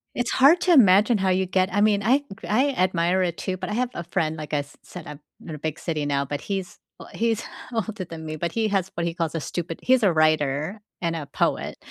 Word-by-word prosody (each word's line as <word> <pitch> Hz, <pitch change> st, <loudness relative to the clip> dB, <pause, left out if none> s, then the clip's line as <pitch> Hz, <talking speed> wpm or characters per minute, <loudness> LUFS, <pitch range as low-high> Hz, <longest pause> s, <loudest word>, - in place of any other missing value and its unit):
It's 245 Hz, -1 st, -1 dB
hard 290 Hz, +7 st, +6 dB
to 360 Hz, -, +4 dB
imagine 210 Hz, -, +6 dB
how 190 Hz, 0 st, +1 dB
you 185 Hz, 0 st, +2 dB
get 185 Hz, 0 st, +1 dB
I 205 Hz, +2 st, +1 dB
mean, 210 Hz, -1 st, +3 dB
I 265 Hz, +6 st, +3 dB, 0.3 s
I 260 Hz, +7 st, +3 dB
admire 185 Hz, -3 st, +1 dB
it 175 Hz, -2 st, -1 dB
too, 185 Hz, -1 st, -3 dB
but -, -, -5 dB
I 210 Hz, -, -3 dB
have 245 Hz, +2 st, 0 dB
a 170 Hz, -, -5 dB
friend 160 Hz, -2 st, -1 dB
like 155 Hz, 0 st, -7 dB
I -, -, +3 dB
s 145 Hz, 0 st, -8 dB
said, 180 Hz, -, -10 dB
I'm 150 Hz, -1 st, -9 dB, 0.3 s
in 160 Hz, -, -6 dB
a 150 Hz, -, -10 dB
big 155 Hz, -1 st, -3 dB
city 155 Hz, -4 st, -3 dB
now, 140 Hz, -1 st, 0 dB
but 145 Hz, +1 st, -4 dB
he's, 195 Hz, -3 st, -5 dB, 0.2 s
we -, -, -10 dB
he's 230 Hz, -1 st, 0 dB, 0.3 s
older 220 Hz, -4 st, -3 dB
than 165 Hz, -1 st, -9 dB
me, 155 Hz, 0 st, -4 dB
but 170 Hz, +2 st, -3 dB
he 225 Hz, -1 st, +1 dB
has 195 Hz, -2 st, 0 dB
what 170 Hz, -, -1 dB
he 170 Hz, -, -2 dB
calls 165 Hz, -1 st, -2 dB
a -, -, 0 dB
stupid 165 Hz, +1 st, -5 dB
he's 255 Hz, -1 st, +4 dB
a 195 Hz, -, +5 dB
writer 155 Hz, +4 st, +1 dB, 0.2 s
and 165 Hz, -1 st, -1 dB
a 150 Hz, -3 st, -5 dB
poet, -, -, -1 dB
185 Hz, 250 wpm, -24 LUFS, 160-210 Hz, 0.3 s, hard